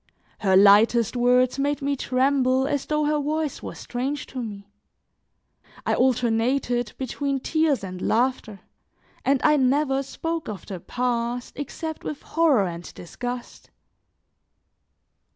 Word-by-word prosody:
Her 190 -3 +3
lightest 210 +4 +5
words 250 +2 +3
made 285 +1 0
me 280 0 -1
tremble 260 0 +2
as 285 -1 -2
though 300 0 +1
her 300 0 +1
voice 300 0 -2
was - - -7
strange 260 +3 -3
to 260 - -6
me; 205 -3 -8 1.1
I - - +1
alternated 245 -1 +1
between 275 +1 -2
tears 315 -3 +1
and 185 -1 -6
laughter, 235 -3 0 0.6
and 275 0 +2
I 300 -1 +5
never 270 +1 +2
spoke 325 +3 -4
of 205 -3 -7
the 190 -3 -6
past 245 +2 -2
except 315 +2 -6
with 295 - -6
horror 300 -11 +3
and 170 -1 -6
disgust. 245 +7 -7
255 Hz, 125 wpm, -24 LUFS, 235-285 Hz, 1.1 s, lightest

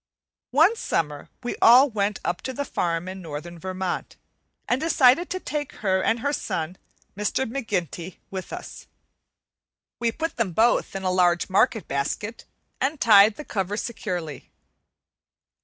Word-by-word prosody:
One 325 - +5
summer 150 - -2
we 245 - -3
all 250 +4 +8
went 205 -4 -1
up 175 0 -1
to 260 - -4
the 285 +3 -3
farm 170 -6 -1
in 190 0 -6
northern 170 +1 -7
Vermont, 185 0 -4 0.5
and 245 - +1
decided 315 0 +4
to 370 - -3
take 290 -4 -4
her 190 -1 +3
and 225 +4 +1
her 285 +2 0
son, 170 - -3 0.4
"Mr. 210 +6 0
McGinty," 190 - -3
with 190 -2 -6
us. - - -8 1.1
We 235 -1 +1
put 325 +7 -4
them 215 -7 0
both 225 0 +2
in 195 - -4
a 185 - +1
large 180 0 +2
market 220 +2 +2
basket 175 +11 -3 0.3
and 285 +2 -1
tied 210 -1 +7
the 300 - -8
cover 200 0 -2
securely. 180 - -5
205 Hz, 145 wpm, -25 LUFS, 180-250 Hz, 1.1 s, all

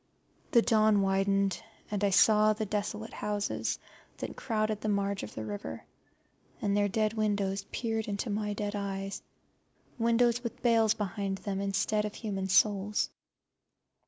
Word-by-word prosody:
The 235 -2 +5
dawn 215 -3 +4
widened, 195 0 +1 0.3
and 205 -1 -1
I 200 - +4
saw 215 +2 +5
the 215 +1 -3
desolate 210 +2 -3
houses 210 -1 -2 0.4
that - - -5
crowded 215 -3 -1
the 215 - -1
marge 200 -1 0
of 105 - -8
the 110 - -4
river, 100 -6 -6 0.7
and 200 -1 0
their 205 0 +3
dead 215 +1 +1
windows 200 -3 0
peered 225 -2 -2
into 205 +2 -2
my 210 0 -1
dead 205 0 -3
eyes, 195 -1 -4 0.8
windows 235 +1 +3
with 235 - -6
bales 225 -2 +4
behind 200 -2 -2
them 195 0 -3
instead 200 +2 +1
of 210 -1 -4
human 195 -4 -3
souls. 205 +2 +3
205 Hz, 145 wpm, -30 LUFS, 195-215 Hz, 0.8 s, The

